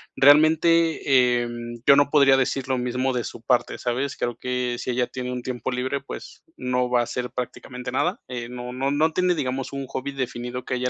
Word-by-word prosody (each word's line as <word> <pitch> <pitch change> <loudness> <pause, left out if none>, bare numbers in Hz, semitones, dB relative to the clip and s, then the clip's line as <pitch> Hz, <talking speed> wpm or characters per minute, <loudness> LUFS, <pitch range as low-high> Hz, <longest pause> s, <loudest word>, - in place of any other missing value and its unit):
Realmente, 150 -4 +4
em, 120 0 -6
yo 140 - +8
no 145 0 +4
podría 140 -2 +5
decir 135 0 -1
lo 130 -1 0
mismo 125 +2 -1
de 125 -1 -1
su - - -8
parte, 120 +1 +1
¿sabes? 130 +3 -2
Creo 120 -1 -2
que 125 -1 -2
si - - -5
ella 125 0 +1
tiene 125 0 -5
un 125 -1 -4
tiempo 125 0 -4
libre, 130 +2 -2
pues, - - -10
no 125 0 0
va 125 -1 +3
a - - +1
hacer 125 +1 -4
prácticamente 125 0 -6
nada. 175 - 0
Eh, 120 -2 -5
no 125 0 -7
no 135 +2 -1
no 155 +3 +2
tiene, 180 0 +2
digamos, 135 -3 -3
un 140 0 -4
hobby 130 +2 -4
definido 125 -2 -4
que - - -3
a - - 0
ella 125 0 -1
125 Hz, 215 wpm, -24 LUFS, 125-140 Hz, -, yo